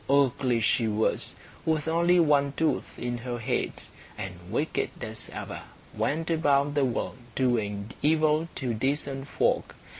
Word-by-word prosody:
Ugly 130 Hz, -3 st, +3 dB
she 115 Hz, +2 st, +2 dB
was, 110 Hz, 0 st, 0 dB, 0.3 s
with 160 Hz, -1 st, 0 dB
only 170 Hz, +2 st, +4 dB
one 145 Hz, -3 st, +4 dB
tooth 160 Hz, -1 st, 0 dB
in 120 Hz, 0 st, -3 dB
her 120 Hz, 0 st, -4 dB
head, 115 Hz, -, 0 dB, 0.5 s
and 95 Hz, -1 st, -4 dB, 0.2 s
wicked 145 Hz, -, 0 dB
as 110 Hz, -1 st, -5 dB
ever -, -, -6 dB, 0.3 s
went 160 Hz, +3 st, 0 dB
about 145 Hz, -3 st, +3 dB
the 145 Hz, -2 st, +3 dB
world 125 Hz, +1 st, -2 dB, 0.2 s
doing 110 Hz, -5 st, 0 dB
evil 155 Hz, +1 st, +3 dB
to 125 Hz, -4 st, -1 dB
decent 135 Hz, +3 st, -1 dB
folk. -, -, +1 dB
140 Hz, 140 wpm, -28 LUFS, 120-155 Hz, 0.5 s, only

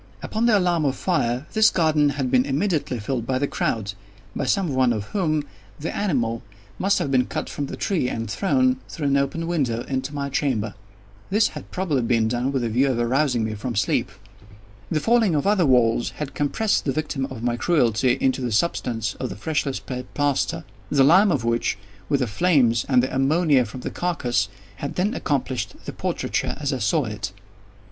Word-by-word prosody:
Upon 225 Hz, +2 st, 0 dB
the 220 Hz, -3 st, +5 dB
alarm 175 Hz, -4 st, +1 dB
of 135 Hz, -, +1 dB
fire, 130 Hz, -7 st, 0 dB
this 220 Hz, 0 st, +6 dB
garden 155 Hz, -4 st, +3 dB
had 130 Hz, -3 st, -1 dB
been 125 Hz, -1 st, +4 dB
immediately 145 Hz, -1 st, -1 dB
filled 115 Hz, +1 st, -3 dB
by 130 Hz, -, +1 dB
the 140 Hz, -, +1 dB
crowd—by 100 Hz, +1 st, -4 dB
some 170 Hz, +2 st, +1 dB
one 130 Hz, -2 st, +3 dB
of 105 Hz, -3 st, -3 dB
whom 155 Hz, -7 st, +1 dB, 0.4 s
the 155 Hz, -, -4 dB
animal 120 Hz, -, 0 dB, 0.4 s
must 200 Hz, +2 st, +2 dB
have 140 Hz, -, -1 dB
been 125 Hz, -2 st, +3 dB
cut -, -, -4 dB
from 145 Hz, -, -3 dB
the -, -, -7 dB
tree 165 Hz, -11 st, 0 dB
and 115 Hz, -2 st, -3 dB
thrown, 255 Hz, -, +2 dB
through 155 Hz, -, -5 dB
an 140 Hz, -, +3 dB
open 140 Hz, +4 st, -1 dB
window, 135 Hz, -9 st, -1 dB
into 130 Hz, 0 st, -3 dB
my 140 Hz, -1 st, -3 dB
chamber. 125 Hz, -7 st, -1 dB, 0.6 s
This 210 Hz, +3 st, +3 dB
had -, -, -9 dB
probably 165 Hz, -8 st, -1 dB
been 115 Hz, -1 st, +2 dB
done 125 Hz, +3 st, -1 dB
with 135 Hz, -3 st, -1 dB
the 115 Hz, -, 0 dB
view 130 Hz, +5 st, +2 dB
of 125 Hz, -, 0 dB
arousing 125 Hz, 0 st, +1 dB
me 110 Hz, 0 st, -2 dB
from 115 Hz, +3 st, -4 dB
sleep. 100 Hz, 0 st, +1 dB, 0.8 s
The 155 Hz, -, +1 dB
falling 225 Hz, -3 st, +3 dB
of 145 Hz, -, 0 dB
other 195 Hz, -5 st, +3 dB
walls 120 Hz, -2 st, +3 dB
had 150 Hz, -2 st, -5 dB
compressed 200 Hz, +9 st, 0 dB
the 140 Hz, -, +1 dB
victim 140 Hz, -1 st, -2 dB
of 120 Hz, -4 st, -8 dB
my 120 Hz, -1 st, +1 dB
cruelty 125 Hz, -4 st, +2 dB
into 130 Hz, 0 st, +1 dB
the 125 Hz, -2 st, -2 dB
substance 115 Hz, -4 st, 0 dB
of -, -, -3 dB
the -, -, -6 dB
freshly 145 Hz, +3 st, -1 dB
spread 125 Hz, -1 st, -6 dB
plaster; 145 Hz, -11 st, 0 dB, 0.3 s
the 140 Hz, -2 st, +4 dB
lime 185 Hz, +8 st, +6 dB
of 130 Hz, -8 st, 0 dB
which, 115 Hz, -4 st, 0 dB, 0.3 s
with 140 Hz, -, +2 dB
the -, -, +2 dB
flames, 120 Hz, -3 st, +2 dB
and 125 Hz, -2 st, +4 dB
the 130 Hz, -, -2 dB
ammonia 140 Hz, -1 st, +3 dB
from 120 Hz, +4 st, -8 dB
the -, -, -4 dB
carcass, 120 Hz, -, -1 dB, 0.3 s
had 140 Hz, -, -5 dB
then 200 Hz, +5 st, +1 dB
accomplished 130 Hz, -, -2 dB
the -, -, -5 dB
portraiture -, -, -2 dB
as 140 Hz, -1 st, -1 dB
I 130 Hz, -, -2 dB
saw 125 Hz, +7 st, +1 dB
it. 105 Hz, -3 st, -4 dB
135 Hz, 195 wpm, -23 LUFS, 120-160 Hz, 0.8 s, this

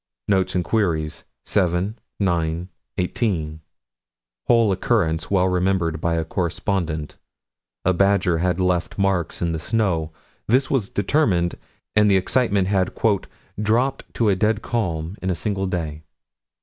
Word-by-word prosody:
Notes 95 Hz, -3 st, +1 dB
and 90 Hz, -, +2 dB
Queries, 85 Hz, -8 st, -1 dB, 0.2 s
7 95 Hz, +3 st, 0 dB, 0.2 s
9 85 Hz, -2 st, 0 dB, 0.3 s
18: 85 Hz, -5 st, -1 dB, 0.9 s
Whole 115 Hz, -3 st, +4 dB
occurrence 85 Hz, -6 st, +1 dB
well 95 Hz, -2 st, +3 dB
remembered 90 Hz, -3 st, 0 dB
by 85 Hz, 0 st, +1 dB
a 80 Hz, -1 st, -1 dB
correspondent: 85 Hz, -3 st, -2 dB, 0.7 s
a 95 Hz, -, +4 dB
badger 95 Hz, -2 st, +3 dB
had 90 Hz, +1 st, 0 dB
left 90 Hz, -2 st, 0 dB
marks 95 Hz, -4 st, 0 dB
in 85 Hz, -, +1 dB
the 80 Hz, -, -2 dB
snow: 85 Hz, -5 st, 0 dB, 0.4 s
this 130 Hz, +4 st, +2 dB
was 125 Hz, -8 st, +1 dB
determined, 95 Hz, -, +1 dB, 0.4 s
and 105 Hz, 0 st, +5 dB
the 95 Hz, -, +5 dB
excitement 100 Hz, -1 st, +2 dB
had 95 Hz, -2 st, +1 dB, 0.7 s
"dropped 120 Hz, +6 st, 0 dB
to 115 Hz, -3 st, +2 dB
a 100 Hz, -, +3 dB
dead 105 Hz, +2 st, +1 dB
calm 90 Hz, -6 st, -2 dB
in 95 Hz, -, -2 dB
a 90 Hz, -, +1 dB
single 95 Hz, +2 st, -2 dB
day." 80 Hz, -5 st, -3 dB
95 Hz, 135 wpm, -22 LUFS, 85-105 Hz, 0.9 s, and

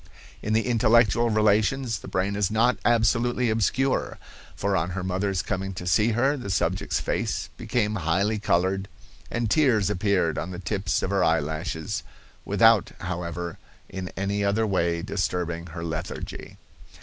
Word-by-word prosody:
"In 105 Hz, -, -2 dB
the 110 Hz, +1 st, +2 dB
intellectual 115 Hz, -1 st, +3 dB
relations 110 Hz, +3 st, +2 dB
the -, -, -11 dB
brain 95 Hz, +2 st, -1 dB
is 100 Hz, -2 st, +1 dB
not 115 Hz, +3 st, +2 dB
absolutely 120 Hz, +1 st, +2 dB
obscure, 130 Hz, +5 st, 0 dB, 0.4 s
for 100 Hz, 0 st, 0 dB
on 85 Hz, -1 st, 0 dB
her 90 Hz, -, -2 dB
mother's 95 Hz, 0 st, -1 dB
coming 95 Hz, -1 st, -3 dB
to 90 Hz, -, -6 dB
see 110 Hz, +5 st, +3 dB
her 135 Hz, +6 st, +2 dB
the 125 Hz, -8 st, -6 dB
subject's 95 Hz, -1 st, 0 dB
face -, -, -2 dB
became 110 Hz, -4 st, -1 dB
highly 95 Hz, +6 st, 0 dB
colored, 95 Hz, 0 st, +1 dB, 0.4 s
and 115 Hz, -1 st, -1 dB
tears 110 Hz, -, +3 dB
appeared 95 Hz, -5 st, +1 dB
on 85 Hz, -, -4 dB
the 90 Hz, -, -6 dB
tips 95 Hz, +1 st, -1 dB
of 95 Hz, -, -1 dB
her 100 Hz, -2 st, +2 dB
eyelashes, 80 Hz, 0 st, -1 dB, 0.4 s
without, -, -, +4 dB
however, 85 Hz, -1 st, -4 dB, 0.3 s
in 95 Hz, -1 st, -5 dB
any 100 Hz, +2 st, -1 dB
other 100 Hz, +3 st, +2 dB
way 85 Hz, -4 st, 0 dB
disturbing 90 Hz, -3 st, -2 dB
her 85 Hz, 0 st, -7 dB
lethargy. 80 Hz, -2 st, -6 dB
100 Hz, 150 wpm, -25 LUFS, 90-110 Hz, 0.4 s, without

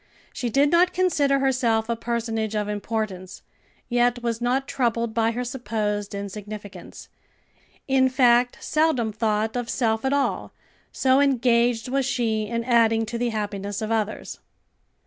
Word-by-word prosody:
She 245 Hz, -, -3 dB
did 280 Hz, +5 st, +3 dB
not 355 Hz, +2 st, +4 dB
consider 295 Hz, -7 st, +2 dB
herself 245 Hz, -5 st, +1 dB
a 235 Hz, -, -1 dB
personage 225 Hz, -2 st, -2 dB
of 210 Hz, -1 st, -1 dB
importance, 205 Hz, -3 st, -4 dB, 0.4 s
yet 245 Hz, 0 st, +1 dB
was 230 Hz, -1 st, -2 dB
not 260 Hz, +3 st, 0 dB
troubled 235 Hz, -4 st, -1 dB
by 225 Hz, 0 st, +2 dB
her 240 Hz, +2 st, -3 dB
supposed 210 Hz, -4 st, -3 dB
insignificance; 200 Hz, -1 st, -8 dB, 0.8 s
in 265 Hz, -1 st, +3 dB
fact 245 Hz, -2 st, +3 dB
seldom 305 Hz, -8 st, +1 dB
thought 220 Hz, +1 st, -1 dB
of 245 Hz, -1 st, -3 dB
self 225 Hz, -3 st, 0 dB
at 265 Hz, -, 0 dB
all, 280 Hz, -1 st, -1 dB, 0.4 s
so 260 Hz, 0 st, +3 dB
engaged 240 Hz, -4 st, +2 dB
was 270 Hz, 0 st, 0 dB
she 220 Hz, -5 st, -1 dB
in 230 Hz, +1 st, -2 dB
adding 225 Hz, -2 st, +3 dB
to 235 Hz, +2 st, -5 dB
the 245 Hz, 0 st, 0 dB
happiness 205 Hz, -2 st, -4 dB
of 220 Hz, 0 st, -3 dB
others. 215 Hz, -1 st, -2 dB
235 Hz, 145 wpm, -24 LUFS, 220-255 Hz, 0.8 s, not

